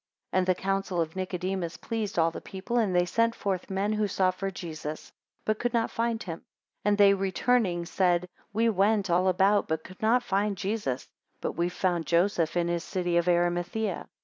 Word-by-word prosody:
5 -, -, 0 dB
And 185 Hz, -, 0 dB
the 185 Hz, -, +3 dB
counsel 195 Hz, -1 st, -1 dB
of 160 Hz, 0 st, -1 dB
Nicodemus 185 Hz, -1 st, -3 dB
pleased 220 Hz, -5 st, -3 dB
all 165 Hz, 0 st, +3 dB
the -, -, -7 dB
people; 195 Hz, +5 st, -5 dB
and 200 Hz, -5 st, +1 dB
they 175 Hz, 0 st, +4 dB
sent 230 Hz, +5 st, +1 dB
forth 190 Hz, -3 st, -2 dB
men 195 Hz, +2 st, 0 dB
who 215 Hz, -1 st, +1 dB
sought 185 Hz, -1 st, +1 dB
for 195 Hz, +1 st, -3 dB
Jesus, 155 Hz, -5 st, -7 dB, 0.3 s
but 215 Hz, 0 st, 0 dB
could 245 Hz, 0 st, -1 dB
not 230 Hz, -1 st, +1 dB
find 230 Hz, -1 st, -1 dB
him; 165 Hz, -3 st, -6 dB, 0.4 s
and 205 Hz, 0 st, +2 dB
they 200 Hz, -1 st, +7 dB
returning, 195 Hz, -1 st, +1 dB
said, 180 Hz, 0 st, +1 dB, 0.2 s
We 225 Hz, +3 st, +2 dB
went 200 Hz, -2 st, +2 dB
all 180 Hz, +2 st, +3 dB
about, 195 Hz, +3 st, +3 dB
but 160 Hz, 0 st, -2 dB
could 185 Hz, +1 st, -13 dB
not 235 Hz, +3 st, +3 dB
find 200 Hz, -2 st, 0 dB
Jesus, 195 Hz, -, -2 dB, 0.3 s
but -, -, -2 dB
we 170 Hz, +1 st, 0 dB
have 180 Hz, -, -6 dB
found 175 Hz, -4 st, 0 dB
Joseph 170 Hz, -1 st, +2 dB
in 170 Hz, -1 st, +2 dB
his 170 Hz, 0 st, -1 dB
city 175 Hz, -2 st, -1 dB
of 170 Hz, 0 st, +1 dB
Arimathaea. 175 Hz, +3 st, 0 dB
190 Hz, 200 wpm, -28 LUFS, 175-205 Hz, 0.4 s, they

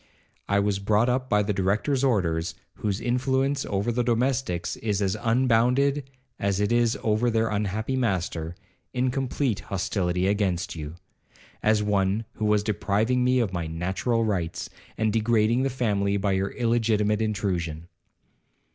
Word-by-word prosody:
I 100 Hz, 0 st, +3 dB
was 100 Hz, -1 st, +1 dB
brought 105 Hz, +4 st, +2 dB
up, 130 Hz, +1 st, -1 dB
by 105 Hz, 0 st, +3 dB
the 105 Hz, +1 st, -1 dB
Director's 105 Hz, +8 st, 0 dB
orders, 85 Hz, -10 st, +1 dB, 0.2 s
whose 100 Hz, -2 st, -2 dB
influence 130 Hz, +3 st, 0 dB
over 100 Hz, +3 st, 0 dB
the 120 Hz, +1 st, 0 dB
domestics 120 Hz, -6 st, 0 dB
is 105 Hz, -3 st, -1 dB
as 100 Hz, 0 st, 0 dB
unbounded 125 Hz, +4 st, +2 dB, 0.3 s
as 100 Hz, -1 st, 0 dB
it 105 Hz, +1 st, +1 dB
is 120 Hz, -1 st, +2 dB
over 110 Hz, +2 st, +2 dB
their 115 Hz, -1 st, +1 dB
unhappy 105 Hz, +4 st, -1 dB
master, 90 Hz, -8 st, -1 dB, 0.4 s
in 125 Hz, 0 st, +1 dB
complete 130 Hz, -3 st, -1 dB
hostility 90 Hz, -2 st, -1 dB
against 100 Hz, -3 st, 0 dB
you, 75 Hz, 0 st, -6 dB, 0.7 s
as 105 Hz, -1 st, +3 dB
one 100 Hz, +1 st, +1 dB
who 110 Hz, -, -3 dB
was 105 Hz, -1 st, +3 dB
depriving 110 Hz, +4 st, +1 dB
me 125 Hz, +1 st, +3 dB
of 115 Hz, -7 st, 0 dB
my 85 Hz, -3 st, -2 dB
natural 95 Hz, +8 st, -1 dB
rights, 90 Hz, -6 st, -2 dB, 0.3 s
and 110 Hz, -1 st, +1 dB
degrading 115 Hz, +1 st, +2 dB
the 135 Hz, -, +1 dB
family 100 Hz, -6 st, 0 dB
by 100 Hz, 0 st, 0 dB
your 95 Hz, +1 st, 0 dB
illegitimate 110 Hz, -3 st, +1 dB
intrusion. 90 Hz, -7 st, -2 dB
105 Hz, 145 wpm, -26 LUFS, 100-120 Hz, 0.7 s, I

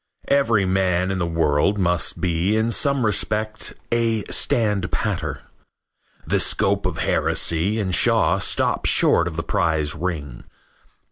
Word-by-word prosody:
Every 115 Hz, -8 st, +2 dB
man 95 Hz, -1 st, 0 dB
in 95 Hz, -, -3 dB
the 85 Hz, -, -1 dB
world 80 Hz, +3 st, +1 dB
must 90 Hz, -3 st, +1 dB
be 90 Hz, +3 st, 0 dB
in 110 Hz, +1 st, 0 dB
some 140 Hz, +2 st, +1 dB
respect 110 Hz, 0 st, -1 dB, 0.2 s
a 115 Hz, -2 st, 0 dB
standpatter. 105 Hz, -6 st, -1 dB, 0.8 s
The -, -, 0 dB
scope -, -, +1 dB
of -, -, -5 dB
heresy 85 Hz, +7 st, 0 dB
in 95 Hz, -3 st, -2 dB
Shaw -, -, +3 dB
stops -, -, 0 dB
short 85 Hz, -, +3 dB
of 85 Hz, -, -6 dB
the 85 Hz, -, -3 dB
prize 80 Hz, -2 st, 0 dB
ring. 75 Hz, -8 st, -5 dB
95 Hz, 130 wpm, -21 LUFS, 85-110 Hz, 0.8 s, Shaw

